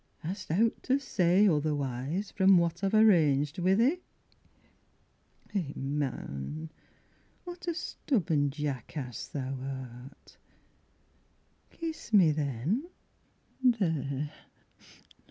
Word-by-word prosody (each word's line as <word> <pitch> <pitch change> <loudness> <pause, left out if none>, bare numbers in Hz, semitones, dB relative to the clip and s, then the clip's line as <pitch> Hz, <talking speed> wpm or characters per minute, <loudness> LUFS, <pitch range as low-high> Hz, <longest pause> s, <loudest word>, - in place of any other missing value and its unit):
Hast 185 +3 -5
owt 220 +8 +2
to 265 - +2
say 195 -6 +3
otherwise 150 +2 -1
From 190 -1 +5
what 170 +2 0
I've 195 +2 +2
arranged 155 -8 +4
wi' 185 +2 +3
thee? 260 - +3 1.5
Eh 170 -9 -2
man, 140 - -4 0.7
what 355 0 -9
a 340 - 0
stubborn 170 - 0
jackass 140 -3 -5
thou 135 -1 -4
art, 130 0 -9 1.3
Kiss 325 -7 -6
me 180 -7 +7
then 150 - -1 0.7
there! 160 - +1
160 Hz, 90 wpm, -30 LUFS, 140-205 Hz, 1.5 s, me